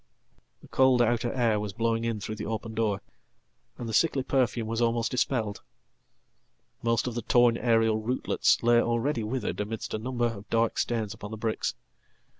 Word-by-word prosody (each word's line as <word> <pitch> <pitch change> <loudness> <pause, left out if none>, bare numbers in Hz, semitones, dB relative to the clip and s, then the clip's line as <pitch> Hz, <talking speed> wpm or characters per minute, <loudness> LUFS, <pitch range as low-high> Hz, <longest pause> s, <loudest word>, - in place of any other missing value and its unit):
The - - -13
cold 130 -1 +4
outer 120 0 +2
air 115 -5 +1
was 105 -1 -4
blowing 115 +1 0
in 115 -2 -1
through 110 +2 -5
the 105 - -5
open 110 +1 -4
door, 105 -3 0 0.8
and 120 - -5
the 110 - -4
sicklyperfume 130 -4 +1
was 115 +1 -2
almost 115 0 +1
dispelled. 120 -5 -1 1.2
Most 115 0 +1
of 125 - -2
the 120 - -3
torn 120 +1 +4
aerial 115 -2 +2
rootlets 125 +1 +1
lay 120 0 +5
alreadywithered 120 -1 -1
amidst 105 +2 -4
a 110 - -1
number 120 +1 -1
of 110 -3 -4
dark 115 0 +1
stains 110 -3 -1
upon 105 -2 -9
the 110 - -6
bricks. 110 0 -2
115 Hz, 165 wpm, -28 LUFS, 110-120 Hz, 1.2 s, lay